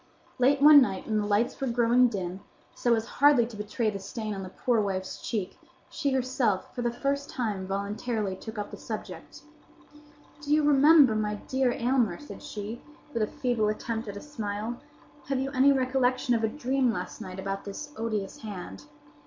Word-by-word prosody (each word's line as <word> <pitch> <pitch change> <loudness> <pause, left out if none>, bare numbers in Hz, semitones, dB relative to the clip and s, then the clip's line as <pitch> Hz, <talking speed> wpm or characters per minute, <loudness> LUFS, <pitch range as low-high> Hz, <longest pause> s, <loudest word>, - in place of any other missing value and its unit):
Late 275 +3 +3
one 295 -1 +10
night 195 -7 -1
when 215 -1 0
the 205 - -1
lights 210 +6 0
were 270 - 0
growing 240 +1 +4
dim, 190 -4 -4 0.3
so 240 -1 +2
as 220 0 -2
hardly 280 -2 +4
to 230 -1 -10
betray 215 +2 -1
the 200 - -5
stain 215 +2 -5
on 195 - -5
the 185 - -7
poor 235 +3 +1
wife's 190 -2 -3
cheek, 210 -6 -4 0.3
she 285 - -1
herself, 255 -6 0
for 245 - -4
the 240 0 0
first 280 +3 -2
time, 210 -7 -3
voluntarily 200 +1 -2
took 220 +3 -9
up 205 0 -4
the - - -8
subject. - - -8 1.0
"Do 295 0 -5
you 305 0 +4
remember, 290 -2 +6
my 210 -1 -1
dear 260 +4 0
Aylmer," 240 -7 +1
said 290 - -10
she, 225 -5 -6 0.3
with 230 - -1
a 215 - +2
feeble 240 -4 0
attempt 225 +1 -3
at 200 0 -6
a - - -7
smile, 225 -4 -4 0.5
"have 270 -1 0
you 270 +1 -2
any 275 +1 +5
recollection 255 -1 +1
of 230 -1 +1
a - - +4
dream 260 -1 0
last 180 -4 -5
night 185 -1 -7
about 195 0 -4
this 290 +9 -7
odious 220 +2 -3
hand?" 185 - -8
230 Hz, 185 wpm, -28 LUFS, 205-260 Hz, 1.0 s, one